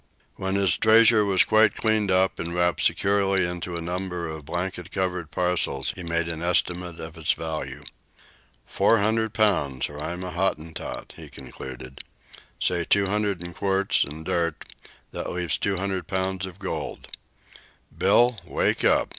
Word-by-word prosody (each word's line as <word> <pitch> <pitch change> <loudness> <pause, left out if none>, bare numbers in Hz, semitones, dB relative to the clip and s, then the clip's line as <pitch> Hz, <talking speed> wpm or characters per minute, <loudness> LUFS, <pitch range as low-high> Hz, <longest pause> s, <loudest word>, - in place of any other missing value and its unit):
When 95 0 -2
his 100 -4 +4
treasure 110 0 +6
was 95 -2 +4
quite 110 +1 +4
cleaned 110 -2 +1
up 95 0 +2
and 85 +1 -4
wrapped 90 0 +2
securely 100 -2 +2
into 90 0 -5
a 85 - -3
number 90 0 -3
of 80 -2 -7
blanket 90 0 -4
covered 90 -4 -2
parcels, 80 -5 0
he 95 - -8
made 85 0 -1
an 85 -1 -4
estimate 90 0 0
of 80 0 -8
its 80 - +1
value. 80 -1 -5 0.8
"Four 115 - +3
hundred 110 +1 +1
pounds, 75 - +1
or 75 0 -9
I'm 90 +3 -4
a 90 - -5
Hottentot," 85 -3 -3
he - - -9
concluded. 65 0 -9 0.6
"Say 90 -1 +1
two 100 +3 +3
hundred 100 -2 -1
in 85 0 -7
quartz 100 +1 +1
an' 75 +3 -7
dirt 85 -1 -2 0.4
that - - -4
leaves 90 -3 -1
two 100 -2 0
hundred 95 -2 -2
pounds 95 -1 -2
of 90 -1 -11
gold. 100 -2 -5 0.9
Bill! 120 -2 +3
Wake - - 0
up! - - +3
90 Hz, 155 wpm, -25 LUFS, 85-100 Hz, 0.9 s, treasure